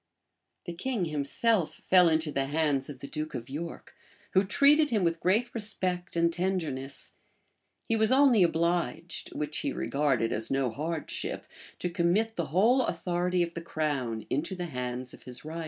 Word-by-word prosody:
[] - - -53
The 175 - -5
king 210 +2 -2
himself 160 - +1
fell 180 -2 +4
into 160 -1 +1
the 135 -1 -1
hands 145 -2 0
of 135 -3 -9
the 140 - -6
duke 155 -1 -4
of 125 +1 -6
York, 165 +4 -6 0.4
who 190 - +4
treated 285 +8 +4
him 215 -5 +1
with 165 -1 +1
great 215 +8 +1
respect 185 -6 -2
and 170 0 +2
tenderness: 160 -8 -2 0.7
he 225 - +2
was 220 +1 +2
only 265 -5 +5
obliged 170 0 0
(which 150 0 -2
he - - -1
regarded 135 -6 0
as 110 - -1
no 135 -3 +1
hardship) 155 +5 -3 0.3
to - - -2
commit 180 +6 +1
the 170 -3 -2
whole 215 - +4
authority 175 +1 0
of 170 0 -4
the 170 - -5
crown 140 -9 -2
into 155 +7 -1
the 180 -1 -4
hands 125 -4 -4
of - - -13
his 125 +3 -8
rival. 160 +2 -5
170 Hz, 170 wpm, -29 LUFS, 145-185 Hz, 0.7 s, only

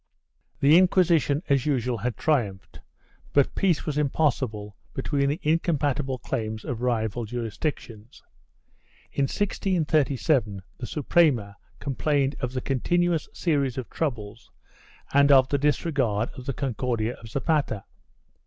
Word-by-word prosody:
1 140 - +5
The 160 - +9
Inquisiton, 170 -5 +3
as 140 0 +2
usual, 125 -4 0
had 115 0 -3
triumphed, 110 -11 -1 0.5
but 140 -2 +3
peace 180 -6 +1
was 150 -1 -2
impos 150 0 +2
sible 105 -4 -5 0.2
between 140 +1 0
the 150 +4 -2
incompatible 150 -4 0
claims 110 -4 -4
of 120 -2 -4
rival 120 -2 -1
jurisdictions. 115 0 -5 0.9
In 140 - +1
1637 150 - 0 0.2
the 120 - -5
Suprema 140 -9 +2 0.2
complained 140 0 0
of 125 0 -3
the 130 - -2
continuous 170 +6 0
series 140 -7 0
of 130 - -5
troubles 115 -8 -4 0.6
and 140 +1 +5
of 130 -2 +6
the 140 - +1
disregard 135 -7 0
of 130 -1 -10
the 135 - -1
Concordia 120 -3 -2
of 110 - -12
Zapata. 140 - 0
135 Hz, 125 wpm, -25 LUFS, 115-150 Hz, 0.9 s, The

